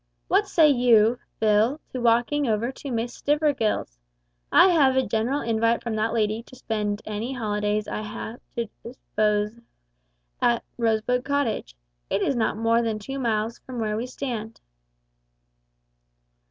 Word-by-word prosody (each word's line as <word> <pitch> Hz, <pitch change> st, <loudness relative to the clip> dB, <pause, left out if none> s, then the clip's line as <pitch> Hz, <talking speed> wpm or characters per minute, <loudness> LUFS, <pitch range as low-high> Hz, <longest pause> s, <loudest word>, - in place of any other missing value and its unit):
What 400 Hz, +2 st, +3 dB
say 320 Hz, -3 st, +5 dB
you, 240 Hz, -4 st, +4 dB, 0.2 s
Phil, 220 Hz, +6 st, +3 dB
to 255 Hz, -, -3 dB
walking 240 Hz, +5 st, +2 dB
over 225 Hz, +3 st, 0 dB
to 275 Hz, +1 st, -8 dB
Miss 240 Hz, 0 st, -2 dB
Stivergill's? 280 Hz, -, 0 dB, 0.5 s
I 380 Hz, -, +7 dB
have 280 Hz, -7 st, +4 dB
a 265 Hz, -, +2 dB
general 230 Hz, +7 st, 0 dB
invite 230 Hz, 0 st, +1 dB
from 230 Hz, -2 st, -2 dB
that 220 Hz, +1 st, 0 dB
lady 220 Hz, -1 st, 0 dB
to 250 Hz, -, -16 dB
spend 210 Hz, -4 st, -3 dB
any 215 Hz, +5 st, -3 dB
holidays 210 Hz, -3 st, -1 dB
I -, -, -3 dB
have 220 Hz, +2 st, -7 dB, 0.2 s
to 235 Hz, -, -1 dB, 0.2 s
dispose 210 Hz, -2 st, -1 dB
of -, -, -25 dB, 0.8 s
at 235 Hz, -1 st, +2 dB, 0.2 s
Rosebud 230 Hz, +2 st, +1 dB
Cottage. 245 Hz, -, -1 dB, 0.3 s
It -, -, 0 dB
is 275 Hz, -, +1 dB
not 225 Hz, -2 st, 0 dB
more 230 Hz, +1 st, +2 dB
than 225 Hz, -2 st, -1 dB
two 270 Hz, +6 st, -6 dB
miles 225 Hz, -2 st, -1 dB
from 255 Hz, -1 st, -9 dB
where 215 Hz, -2 st, -1 dB
we 230 Hz, +3 st, -3 dB
stand." 235 Hz, -4 st, -5 dB
230 Hz, 150 wpm, -25 LUFS, 215-255 Hz, 0.8 s, I